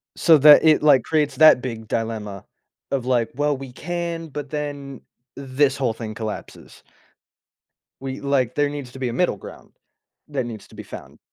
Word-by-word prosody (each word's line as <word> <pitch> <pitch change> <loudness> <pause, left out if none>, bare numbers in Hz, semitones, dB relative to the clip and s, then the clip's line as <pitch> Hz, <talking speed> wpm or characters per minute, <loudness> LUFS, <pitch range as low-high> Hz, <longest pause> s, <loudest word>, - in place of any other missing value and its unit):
So 160 -2 +5
that 150 +2 +8
it, 155 -1 +5
like, 145 -5 +5
creates 150 -2 0
that 155 -4 +7
big 115 -4 -6
dilemma 110 -3 -4 0.5
of 135 -3 -1
like, 120 -3 +1
"Well, 145 +1 0
we 135 -1 -9
can, 170 +2 -4
but 145 0 -7
then 145 -3 -6 0.3
this 135 0 0
whole 125 -4 0
thing 110 -1 -7
collapses." 110 -1 -8 1.2
We 135 0 -6
like, 135 -3 0
there 145 -1 +1
needs 145 -4 -7
to 135 - -10
be 130 -2 -2
a - - -5
middle 175 - 0
ground - - -13 0.6
that 140 -4 -3
needs 110 -4 -9
to - - -18
be - - -8
found. - - -11
135 Hz, 175 wpm, -22 LUFS, 120-150 Hz, 1.2 s, that